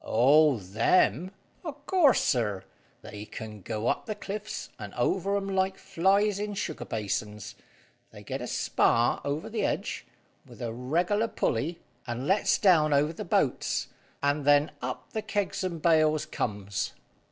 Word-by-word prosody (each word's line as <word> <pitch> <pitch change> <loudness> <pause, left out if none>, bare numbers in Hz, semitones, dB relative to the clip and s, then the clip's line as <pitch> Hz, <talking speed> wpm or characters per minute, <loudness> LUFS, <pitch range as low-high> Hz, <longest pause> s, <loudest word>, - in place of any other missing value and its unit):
"Oh, 140 +4 +5
them! 110 - +2 0.3
O' 315 -4 -4
course, 290 0 +3
sir, 105 -6 0 0.4
they 105 0 -8
can 105 -1 -8
go 110 +3 -4
up - - 0
the 215 - -3
cliffs, 210 +2 -6
and - - -8
over 195 +2 +1
'em 195 -1 -3
like 190 0 +1
flies 195 +2 +2
in 210 0 -3
sugar 165 -5 -4
basins. 105 -1 -3 0.6
They - - -13
get - - -5
a - - -4
spar 120 +1 +2
over 145 +3 -3
the - - -2
edge, - - -2 0.4
with - - -15
a 115 -2 -3
reg'lar 175 - 0
pulley, 165 - -1 0.3
and 120 +2 -3
lets 195 +6 +3
down 160 -7 +4
over 150 +3 +2
the - - -6
boats, - - 0 0.3
and 145 +1 +1
then 145 +1 +4
up 125 +1 -5
the 220 - -1
kegs 205 -2 -2
and 175 -3 -3
bales 155 -2 +3
comes." 100 -9 -3
155 Hz, 155 wpm, -28 LUFS, 115-195 Hz, 0.6 s, Oh